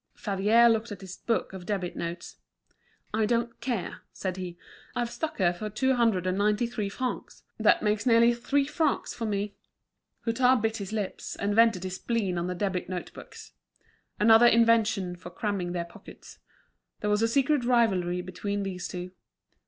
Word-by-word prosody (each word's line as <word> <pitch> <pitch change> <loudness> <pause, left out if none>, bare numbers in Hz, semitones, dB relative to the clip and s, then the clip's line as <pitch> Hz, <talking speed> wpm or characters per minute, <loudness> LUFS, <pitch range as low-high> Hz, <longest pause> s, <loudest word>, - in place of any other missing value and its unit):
Favier 210 +4 +3
looked 225 0 +1
at 205 - -7
his 190 -1 -8
book 230 -4 -1
of 185 -2 -9
debit 190 -4 -2
notes. 170 +1 -6 0.8
"I 215 0 +2
don't 235 0 -1
care!" 240 -8 -3
said 185 -2 -4
he, 180 -2 -6 0.4
"I've 240 -1 -1
stuck 320 +4 -4
her 175 -2 +3
for 215 +4 -5
two 260 +5 +1
hundred 225 -7 +2
and 185 +1 0
ninety 210 +3 +2
three 220 -4 -3
francs. 255 +5 -5 0.2
That - - +4
makes 210 +1 0
nearly 235 0 +6
three 275 +4 0
francs 300 +1 -1
for 230 - -4
me." 205 0 -2 0.7
Hutin 250 +2 +3
bit 225 +1 -1
his 200 -1 -6
lips, 210 -3 -4
and 205 +1 -1
vented 225 -4 +4
his 185 -1 -4
spleen 200 -7 -1
on 170 - -2
the 180 - -3
debit 185 -1 -2
notebooks. 180 -2 -8 0.7
Another 225 +2 +7
invention 225 -6 +3
for 175 0 -10
cramming 185 -1 -3
their 175 -1 -2
pockets. 170 - -14 0.6
There 210 - -1
was 210 +1 +2
a 225 - +4
secret 275 +3 +2
rivalry 195 -8 +2
between 200 +3 -3
these 180 -2 -4
two. 180 0 -6
210 Hz, 170 wpm, -28 LUFS, 185-235 Hz, 0.8 s, Another